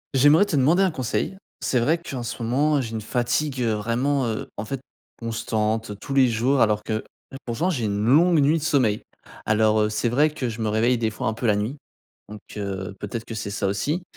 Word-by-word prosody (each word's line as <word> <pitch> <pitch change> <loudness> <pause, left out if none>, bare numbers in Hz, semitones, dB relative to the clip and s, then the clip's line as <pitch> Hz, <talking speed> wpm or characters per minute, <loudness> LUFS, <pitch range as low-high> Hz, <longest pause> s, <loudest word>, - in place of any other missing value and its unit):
J'aimerais 145 +9 +6
te 175 - -2
demander 155 +8 +4
un 190 - +2
conseil. 140 +6 -2 0.2
C'est 125 - +1
vrai 155 +8 +2
qu'en 140 -7 -6
ce 120 +1 -5
moment, 145 +6 +2
j'ai 115 -3 -5
une 110 -1 -4
fatigue, 125 +4 -1
heu, 115 -2 +1
vraiment, 120 +5 0
heu, 110 -1 -3
en 110 - -4
fait, 135 +4 -4 0.4
constante 110 -2 -2
tous 135 - -6
les 135 -2 +5
jours 120 +4 +1
alors 105 -1 +2
que, 110 0 -2 0.4
pourtant 155 +10 0
j'ai 125 -9 -1
une 100 -1 -1
longue 160 +7 +5
nuit 150 +3 +3
de - - -7
sommeil. 130 -9 +2 0.5
Alors, 110 0 +3
heu, 105 - +2
c'est 105 +3 0
vrai 145 +6 +3
que 140 -5 -3
je 115 0 -6
me 110 - 0
réveille 115 +3 +2
des 110 -1 +1
fois, 110 - -6
un 110 - +1
peu 115 +2 -2
la 105 - +4
nuit 110 +8 -2 0.5
donc 105 0 -8 0.2
heu, 95 -1 -4
peut-être 110 +2 -5
que 115 - -7
c'est 100 -1 -4
ça 100 0 -1
aussi, 140 - -1
120 Hz, 220 wpm, -24 LUFS, 110-140 Hz, 0.5 s, J'aimerais